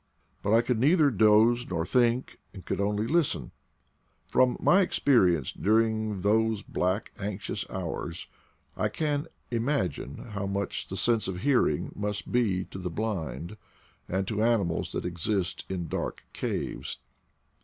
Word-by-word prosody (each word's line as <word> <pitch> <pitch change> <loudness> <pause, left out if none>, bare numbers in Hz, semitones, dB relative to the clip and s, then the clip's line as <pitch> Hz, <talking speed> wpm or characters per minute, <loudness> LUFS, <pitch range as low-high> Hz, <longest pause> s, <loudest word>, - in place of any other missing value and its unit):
But 100 - -1
I 115 - +6
could 120 -1 0
neither 150 +2 +4
doze 110 +3 +4
nor 85 -3 -1
think, 120 +3 +1 0.2
and 95 - -10
could - - -1
only 105 +2 0
listen. 165 +5 +1 0.7
From 125 -1 +3
my 195 +3 +5
experience 95 - +3
during 110 -1 +1
those 110 +1 +2
black 95 +4 -1
anxious 100 0 -4
hours - - -4 0.5
I 105 - 0
can 145 +5 -1 0.2
imagine 115 - -2
how 100 -2 -3
much 100 0 -3
the 95 - -5
sense 115 +2 +2
of 90 -1 -4
hearing 120 - +2
must 105 0 -3
be 100 -7 +1
to 95 - -6
the 90 -1 -3
blind 95 -1 -4 0.5
and 95 +1 -1
to 105 -1 -1
ani 115 -2 +3
mals 85 -2 -2
that - - -3
exist 90 +2 -2
in 90 -3 -3
dark - - -4
caves. - - -3
105 Hz, 145 wpm, -28 LUFS, 95-120 Hz, 0.7 s, I